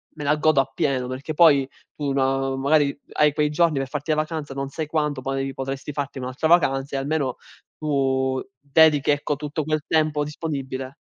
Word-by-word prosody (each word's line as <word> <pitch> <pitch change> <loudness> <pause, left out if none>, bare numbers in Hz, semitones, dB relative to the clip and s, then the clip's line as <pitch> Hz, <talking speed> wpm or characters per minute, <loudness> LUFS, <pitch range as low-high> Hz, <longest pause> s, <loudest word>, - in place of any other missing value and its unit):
me 150 - -7
la 150 +1 +3
godo 155 -1 +3
appieno, 135 -3 -1
perché 130 +5 -5
poi 145 -4 +5 0.3
tu, 145 -2 -2
no, 135 0 0
magari 140 +1 +2 0.2
hai 150 -1 +3
quei 150 0 +1
giorni 160 0 +2
per 135 - -2
farti 150 +2 -5
la 155 - +1
vacanza, 155 -2 -3
non 135 0 -4
sai 155 +3 -4
quanto, 150 -3 -1
poi, 135 +1 -2
potresti 135 +2 -5
farti 140 -1 -4
un'altra 130 +4 -2
vacanza 140 -5 +2
e - - 0
almeno 140 -2 -1 0.4
tu 135 -3 0 0.2
dedichi, 145 0 +4
ecco, 145 0 0
tutto 150 +1 -3
quel 155 +1 -1
tempo 155 -2 +1
disponibile. 135 -4 -5
145 Hz, 180 wpm, -23 LUFS, 135-155 Hz, 0.4 s, poi